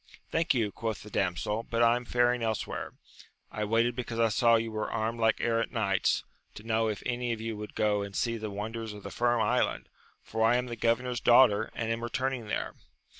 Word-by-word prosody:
Thank 165 -2 +2
you, 110 -4 +1
quoth 110 0 -4
the 105 - -12
damsel, 95 +4 -1
but 115 0 0
I 115 0 +5
am 125 0 -4
faring 120 0 +2
elsewhere. 110 -2 -3 0.6
I 105 - -3
waited 115 +3 +2
because 120 -2 -4
I 115 -1 +4
saw 115 +1 +4
you 115 0 0
were 110 0 -3
armed 115 +1 -2
like 110 -1 +2
errant 115 -1 0
knights, 105 -5 +1 0.3
to 105 - -10
know 110 0 +1
if 105 -2 -3
any 120 -1 -1
of 115 - -6
you 115 0 -4
would 105 0 -8
go 105 -1 +2
and 100 -1 -6
see 115 -1 0
the 110 -1 -5
wonders 110 +2 -5
of 105 -1 -11
the 100 - -7
Firm 120 +4 +1
Island, - - 0 0.3
for 110 0 -2
I 115 +2 +5
am 125 0 +1
the 120 -1 -5
governor's 115 +2 0
daughter, 115 -3 +5
and 115 -1 -2
am 115 0 -2
returning 125 0 -2
there. - - -2
115 Hz, 215 wpm, -29 LUFS, 110-120 Hz, 0.6 s, I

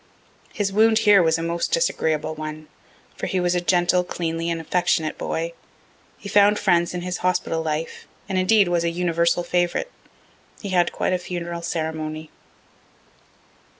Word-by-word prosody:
His 200 -3 -2
wound 220 +1 +4
here 210 -3 +6
was 160 -1 +2
a 165 - -4
most 170 +1 -2
disagreeable 160 - 0
one, 155 0 -7 0.5
for - - -4
he 190 - -1
was 175 0 +1
a 180 - 0
gentle, 175 0 +2
cleanly, 165 -1 -3
and 165 -1 -2
affectionate 160 -1 0
boy. 165 +1 -3 0.6
He - - -10
found 205 +1 +4
friends 175 -1 +1
in 175 - -3
his 180 0 -3
hospital 180 -2 0
life, 160 0 -4 0.2
and, 195 - -3
indeed, 200 +1 +4
was 175 -1 +1
a 170 - +1
universal 170 0 +1
favorite. 175 - -1 0.7
He 200 - -6
had 175 -2 +2
quite - - -1
a 180 - 0
funeral 175 -1 -5
ceremony. 155 -2 -4
175 Hz, 155 wpm, -23 LUFS, 165-185 Hz, 0.7 s, here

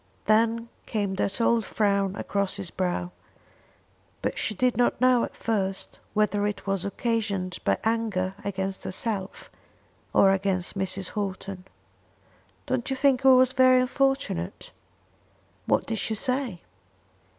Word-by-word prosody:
Then 230 +2 +2 0.2
came 205 -4 -1
that 195 +3 -1
old 230 0 +3
frown 200 -3 0
across 200 -1 -1
his 195 -3 -5
brow; 180 -1 -2 1.1
but - - -1
she 215 - -1
did 250 +4 +2
not 245 +1 +2
know 255 -2 +4
at - - -6
first 195 -4 -2 0.2
whether 205 -1 +2
it 210 - -5
was 195 -2 -1
occasioned 200 -4 -2
by 100 - +2
anger 220 -5 0
against 195 -1 -3
herself 195 0 -3 0.6
or 195 - +5
against 190 -1 -1
Mrs. 190 -1 -2
Houghton. 195 -2 -4 1.0
"Don't 255 -1 -1
you 265 - 0
think 265 -1 +2
it - - +4
was 255 0 +6
very 255 -1 +6
unfortunate?" 265 - -1 1.0
"What - - +2
did 225 -1 -2
she 220 - 0
say?" 250 -5 -1
205 Hz, 130 wpm, -26 LUFS, 190-235 Hz, 1.1 s, was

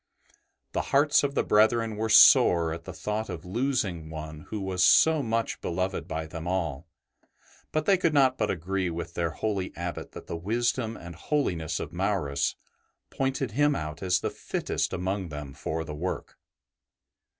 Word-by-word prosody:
The - - 0
hearts 145 +2 +4
of 140 0 -1
the - - +2
brethren 110 +1 +3
were 110 +1 -2
sore 85 -6 +7
at 85 0 -8
the - - -6
thought 105 +1 -3
of 85 -3 -6
losing 95 - -1
one 80 -1 -8
who 110 - -3
was 95 -2 0
so 160 -2 +6
much 115 -2 -2
beloved 90 +2 -2
by 80 0 -3
them 80 +1 -7
all, 85 -4 -2 0.8
but 155 0 0
they 195 - +5
could 165 -3 +2
not 135 -3 +4
but 105 -4 -1
agree 95 +2 -1
with 85 0 -5
their 85 -1 -1
holy 95 +3 -2
Abbot 85 0 -5
that - - -9
the - - -5
wisdom 115 +5 -1
and 85 0 -9
holiness 85 - -1
of - - -6
Maurus 85 -7 0 0.6
pointed 135 -2 -1
him 145 +5 +2
out 75 -1 -5
as 90 -2 +1
the - - -2
fittest - - -2
among 95 0 -2
them 75 -2 -7
for 80 +3 -3
the 80 - -7
work. 90 +5 -4
95 Hz, 170 wpm, -27 LUFS, 85-115 Hz, 0.8 s, sore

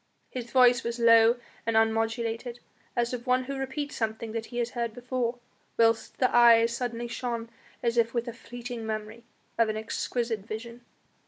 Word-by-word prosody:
His 240 -2 -5
voice 245 -1 +5
was 235 0 -3
low 230 0 +6 0.3
and 225 -1 +1
unmodulated, 225 +2 0 0.4
as 240 0 0
of 245 +1 -5
one 255 +1 +3
who 275 +2 -5
repeats 285 +2 -4
something 220 0 -3
that 225 0 -4
he 240 - -8
has 240 0 -1
heard 235 -3 -3
before, 245 -1 -2 0.4
whilst 225 -1 +2
the 255 - +2
eyes 235 -1 +6
suddenly 240 -1 -3
shone 235 -1 -4 0.3
as 235 0 +2
if 230 0 +2
with 235 0 -2
a 235 - -4
fleeting 240 0 -7
memory 220 +1 -5 0.3
of 230 -1 +4
an 215 - -2
exquisite 225 +1 -2
vision. 230 +4 -8
235 Hz, 170 wpm, -28 LUFS, 225-245 Hz, 0.4 s, low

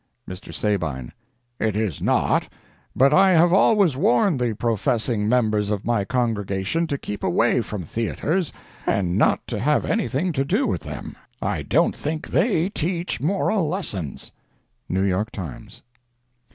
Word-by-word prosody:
Mr. 90 +1 -8
Sabine—It 105 - -3
is 105 -8 -2
not; - - +1 0.4
but 135 +2 +4
I 190 +2 +6
have 170 +1 +5
always 195 - +4
warned 130 +3 +2
the 120 -2 +1
professing 115 -1 0
members 110 -4 +2
of 105 -2 -2
my 115 -4 +1
congregation 115 - -1
to 140 - -2
keep 105 -5 -6
away 120 +7 +2
from 105 -4 -5
theatres 145 - -2 0.4
and 90 -3 +1
not 105 - +2
to 115 - -4
have 150 +7 +2
anything 180 - 0
to 135 -4 0
do 205 - +1
with - - -1
them. - - -7 0.2
I - - -2
don't - - +2
think 155 +1 -4
that - - -13
they 175 - +2
teach 175 -4 -2
moral 190 +2 +1
lessons.—New 95 - -6
York 100 +3 0
Times. 85 - -9
120 Hz, 140 wpm, -23 LUFS, 105-165 Hz, 0.4 s, I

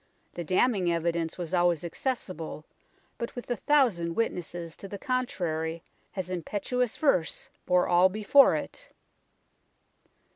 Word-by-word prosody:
The 175 - -4
damning 185 +1 +2
evidence 170 -1 -1
was 175 -1 -5
always 175 -2 +2
accessible, 175 - -4 0.5
but 235 - -4
with 245 0 -6
a - - +2
thousand 215 - +2
wit 230 - +1
nesses 175 -1 -7
to 195 - -8
the 200 - -6
contrary 170 -10 -2 0.3
his 185 -2 -4
impetuous 210 +7 -2
verse 270 - +1 0.2
bore 180 0 +3
all 180 +1 +5
before 215 +8 +5
it. - - -6
185 Hz, 125 wpm, -28 LUFS, 170-240 Hz, 0.5 s, all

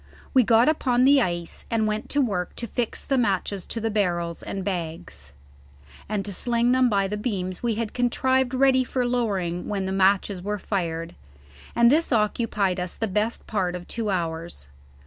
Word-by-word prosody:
We 260 - +6
got 230 +1 +4
upon 255 -5 +2
the 275 0 +6
ice, 175 -5 -3
and 225 -1 +1
went 215 0 -2
to 290 - +2
work 190 -8 -2
to 235 - -4
fix 235 +1 -3
matches 200 -7 0
to 230 - -3
the 225 0 -1
barrels 175 -5 -1
and 195 -1 -5
bags, 170 - -5 0.8
and 210 -2 -2
to 200 - -4
sling 235 +4 +2
them 255 -1 +4
by 200 -2 +1
the 210 +2 -3
beams 190 -5 -3
we 235 -2 0
had 225 -1 -3
contrived 260 +1 +1
ready 260 0 +4
for 255 0 -1
lowering 195 -8 -1
when 195 -2 -2
the 190 - -2
matches 195 0 +2
were 210 +3 -2
fired, 165 -5 -3 0.6
and 235 0 +5
this 320 +2 +2
occupied 210 -4 +1
us 180 0 -3
the 225 - -2
best 210 +4 -1
part 185 -4 -1
of 175 0 -8
two 225 -2 -3
hours. 165 - -3
210 Hz, 180 wpm, -25 LUFS, 185-240 Hz, 0.8 s, We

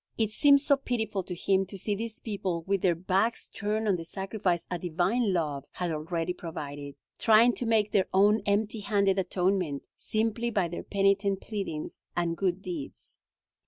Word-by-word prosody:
It 220 -2 +1
seemed 280 +5 +6
so 280 0 +3
pitiful 220 -7 -2
to 180 0 -6
him 190 +2 +1
to 195 - -7
see 205 +3 -1
these 220 +2 -4
people 190 -6 -3
with 195 +1 0
their 180 -3 +3
backs 190 +6 0
turned 215 +1 -2
on 195 -3 +3
the 165 - -6
sacrifice 190 -1 -2
a 180 - -1
divine 185 +7 +1
love 150 -6 -1
had 175 -2 -2
already 165 +3 -2
provided, 145 -4 -7 0.2
trying 225 +2 +6
to 240 - -3
make 215 -2 +2
their 190 - +2
own 205 +3 +4
empty 210 +2 +1
handed 200 -2 +2
atonement, 180 -5 0
simply 225 +2 -1
by 195 -6 0
their 175 - -5
penitent 195 0 +1
pleadings 195 -8 -5
and 170 -1 0
good 190 +1 -1
deeds. 170 -7 -6
195 Hz, 170 wpm, -28 LUFS, 175-215 Hz, 0.2 s, seemed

